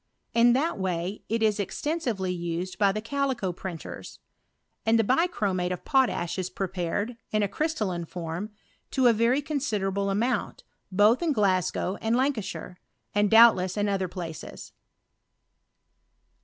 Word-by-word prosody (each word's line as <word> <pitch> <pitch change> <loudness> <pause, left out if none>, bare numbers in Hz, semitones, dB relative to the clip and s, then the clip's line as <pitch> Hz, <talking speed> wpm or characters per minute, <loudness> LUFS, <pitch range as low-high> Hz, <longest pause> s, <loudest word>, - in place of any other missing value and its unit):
In 235 +1 +5
tht^ 285 - 0
vay 180 +2 -2
it 225 +1 0
is 215 -1 +2
extensively 225 - -2
used 175 +1 -4
by 200 -1 +4
the 215 +2 -3
calico 265 -5 -1
printers; 175 -2 -8 0.7
and 225 +1 +3
the 225 - +3
bichromate 205 - +1
of 180 - -5
potash 195 -10 +1
is 185 0 -2
prepared, 190 +4 -3
in 215 -1 +1
a - - +2
crystalline 200 - -2
form, 170 +4 -5 0.4
to 260 -2 +1
a 240 - +7
very 235 +6 +2
constderableamount, 210 -5 -1 0.3
both 210 - +4
in 325 -4 +1
Gla^ow 190 -2 +1
and 225 +1 +1
Lancashire, 245 -8 -2 0.3
and 205 0 +3
doubtless 220 -4 +6
in 205 0 +1
other 195 -2 0
places. 170 -3 -8
205 Hz, 130 wpm, -27 LUFS, 185-240 Hz, 0.7 s, a